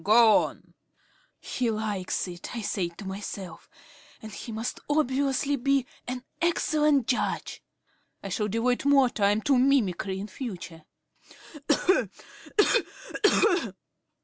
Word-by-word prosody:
"Go 220 +1 +6
on." - - -11 0.7
"He 245 -2 -2
likes 210 -4 -2
it," 175 +5 -8
I 230 - -4
said 175 -4 -2
to 200 - -9
myself, 190 -2 -7 0.5
"and 220 - -9
he 225 - -8
must 225 +2 -4
obviously 280 -1 +1
be 275 0 +1 0.2
an 250 0 -4 0.2
excellent 300 -5 +2
judge. 245 - -2 0.6
I 195 - -5
shall 210 +3 -1
devote 230 +4 0
more 275 -3 +4
time 205 0 +1
to 275 -3 +3
mimicry 200 -8 +1
in 200 - -4
future. 185 - -8
230 Hz, 110 wpm, -27 LUFS, 200-270 Hz, 0.7 s, Go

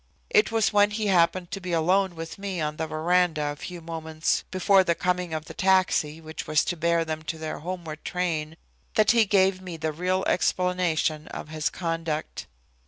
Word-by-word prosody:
It 430 -3 +4
was 220 -1 +2
when 205 0 +5
he 215 +1 -2
happened 180 -2 +2
to 195 - -4
be 180 -1 -4
alone 180 +3 +2
with 165 +4 -7
me 195 -3 -4
on 150 -1 -2
the 160 - -2
veranda 160 -1 +1
a - - -6
few 175 +3 -8
moments 160 -1 -2
before 190 +1 +4
the 170 -2 +1
coming 180 -1 -1
of 155 0 -3
the - - -9
taxi 185 -5 +2
which 160 0 -7
was 155 0 +2
to 175 - -1
bear 170 0 +1
them 155 -1 -4
to 160 +1 -5
their 155 -1 -5
homeward 165 -2 -6
train 160 -4 -2 0.4
that 215 -1 +5
he 230 -2 +4
gave 190 -2 +3
me 180 -3 -7
the 160 0 -2
real 185 +4 -1
explanation 180 -4 +1
of - - -7
his 155 -1 -1
conduct. 165 -3 -3
170 Hz, 190 wpm, -26 LUFS, 160-185 Hz, 0.4 s, when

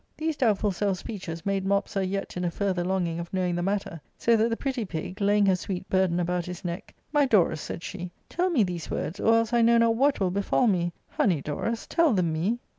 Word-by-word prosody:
These 315 -1 -2
doubtful 210 -5 +2
self 195 +1 0
speeches 175 -5 -7
made 195 -1 0
Mopsa 200 0 0
yet 195 +1 -3
in 180 - -3
a 175 - +1
further 185 0 -1
longing 175 -2 -1
of 170 0 -6
knowing 185 -2 0
the 175 - -1
matter; 195 -4 -2 0.2
so 235 - +3
that 225 +1 +3
tbe 230 - 0
pretty 265 -4 -2
pig,* 185 +1 -6
laying 205 0 +4
her 190 -1 +4
sweet 185 +1 -5
burden 185 -2 +2
about 175 0 -1
his 180 0 -7
neck, 175 +2 -5
" - - -41
My 290 -2 +4
Dorus," 190 -9 +3
said 170 - -6
she, 180 -3 -6
" - - -41
tell 360 +2 0
me 285 -11 +3
these 175 -4 -4
words, 165 +6 -3
or 225 - +4
else 230 0 +1
I 240 - +4
know 235 +1 +5
not 230 0 +4
what 275 +4 +2
will 190 -3 +1
befall 200 +6 +1
me; 175 -5 +2 0.2
honey 175 -6 +1
Dorus, 225 +11 -3
tell 335 -6 +3
them 175 -5 +1
me.?" 185 +9 0
195 Hz, 240 wpm, -27 LUFS, 175-225 Hz, 0.2 s, know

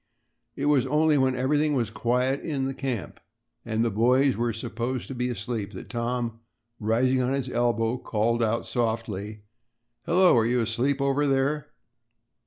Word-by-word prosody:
It 140 - -3
was 140 -3 +3
only 150 +2 +3
when 130 -1 +2
everything 145 +3 +1
was 115 -5 -1
quiet 125 +5 0
in 140 -5 -2
the 135 - -2
camp 130 - -4 0.4
and 110 +1 0
the 115 - 0
boys 125 +5 +3
were 120 +2 0
supposed 120 +3 -4
to - - -4
be 125 0 -2
asleep, 110 -2 -4
that 95 - -9
Tom, 120 -1 -2 0.4
rising 125 +4 +2
on 125 +1 0
his 135 -2 -2
elbow, 120 0 +1
called 115 +1 0
out 115 +1 0
softly: 110 -3 -3 0.6
"Hello. 180 +2 +5
Are 110 - +2
you 125 +1 +1
asleep 120 +5 0
over 140 +1 +1
there?" 140 +2 0
125 Hz, 160 wpm, -26 LUFS, 115-135 Hz, 0.6 s, Hello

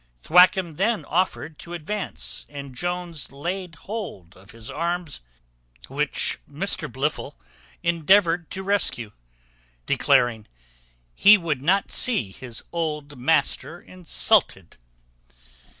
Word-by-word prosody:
Thwackum 180 -2 +5
then 215 +3 +1
offered 165 -3 -1
to 175 0 -7
advance, 190 +5 -4
and 140 -2 -8
Jones 175 0 -4
laid 175 +5 -5
hold 185 - -7
of 95 +2 -18
his 115 0 -9
arms; 170 0 -2 0.7
which - - -1
Mr - - -2
Blifil - - -2 0.5
endeavoured 170 0 +3
to 190 - -5
rescue, 190 - 0 0.7
declaring, 115 -3 +2 0.7
"he 205 - +7
would 160 -7 -2
not 190 +7 +2
see 170 - +2
his 120 +2 -7
old 150 -4 -3
master 160 +4 +1
insulted." 180 - +1
170 Hz, 105 wpm, -24 LUFS, 140-185 Hz, 0.7 s, he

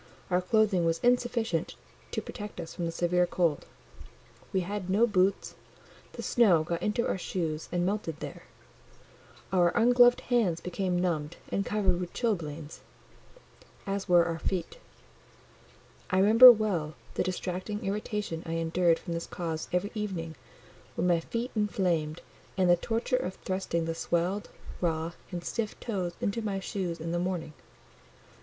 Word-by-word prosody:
Our 180 +1 +3
clothing 200 -2 +2
was 165 0 +1
insufficient 240 -8 +1 0.3
to - - -3
protect 210 -2 -8
us 165 - -6
from 175 -2 -3
the - - -2
severe 175 +1 +1
cold: 170 -6 0 0.8
we 190 - +1
had 190 0 -4
no 205 +5 +4
boots, 195 -3 +1 0.6
the - - -7
snow 195 - +4
got 170 +1 -3
into 215 +3 0
our - - -1
shoes 160 -4 -3
and 175 0 0
melted 185 -6 -2
there: - - -7 1.1
our 175 -2 +5
ungloved 245 +1 +6
hands 220 -9 +1
became 180 0 -2
numbed 170 -3 -1
and 200 - 0
covered 195 -4 +1
with 180 -1 -5
chilblains, 165 - -3 1.1
as 195 0 -3
were 175 -1 +6
our 165 -1 -3
feet: 185 - -3 1.3
I 185 - +1
remember 225 +6 +10
well 190 -9 -1 0.2
the - - -1
distracting 185 +3 -3
irritation 205 -4 -3
I 165 - -5
endured 165 +1 +2
from 170 - -6
this 170 0 -4
cause 165 -2 -4
every 180 +4 0
evening, 190 -7 -4 0.6
when 170 - 0
my 175 -2 +3
feet 235 +8 -4
inflamed; 175 -7 0 0.4
and 185 -1 +3
the 175 - +6
torture 230 +7 -1
of 185 -5 -3
thrusting 185 -3 -2
the 165 - -2
swelled, 175 +5 -1 0.3
raw, 165 -1 0 0.2
and 175 -2 -5
stiff 220 +2 -3
toes 185 -7 -3
into 200 +3 -1
my 200 -3 -2
shoes 185 -3 -3
in 165 +1 -4
the 175 - 0
morning. 175 -3 -3
180 Hz, 150 wpm, -29 LUFS, 170-210 Hz, 1.3 s, remember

